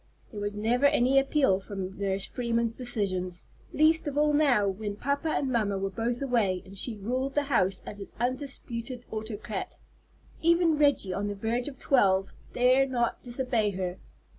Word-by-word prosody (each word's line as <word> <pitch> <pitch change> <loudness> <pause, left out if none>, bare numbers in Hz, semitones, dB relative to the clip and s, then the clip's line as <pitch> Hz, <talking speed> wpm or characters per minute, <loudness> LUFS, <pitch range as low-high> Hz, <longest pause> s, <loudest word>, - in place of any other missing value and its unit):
There 210 - -6
was 205 0 -3
never 240 +6 +3
any 270 -1 +4
appeal 270 -8 +2
from 195 -1 -6
Nurse 195 -1 -1
Freeman's 235 -2 -1
decisions, 190 -8 -3 0.3
least 315 +1 +3
of 290 0 -3
all 300 0 +3
now 275 -9 +4
when 200 +1 -3
papa 280 +7 -1
and 275 -3 0
mamma 210 -5 +1
were 195 0 -2
both 235 +6 -2
away, 215 -9 +1
and 195 +1 -12
she 220 +3 0
ruled 255 +6 -2
the 290 - +2
house 195 -9 +1
as 205 - -7
its 195 - -8
undisputed 245 -1 -3
autocrat. 220 -1 -5 0.6
Even 335 -1 +4
Reggie, 285 -10 +2
on 200 +2 -2
the 205 - -3
verge 230 +5 -1
of 275 -3 -7
twelve, 195 -9 +2 0.2
dare 255 +2 +4
not 240 -3 -1
disobey 240 -3 0
her. 185 -1 -3
235 Hz, 165 wpm, -28 LUFS, 200-270 Hz, 0.6 s, any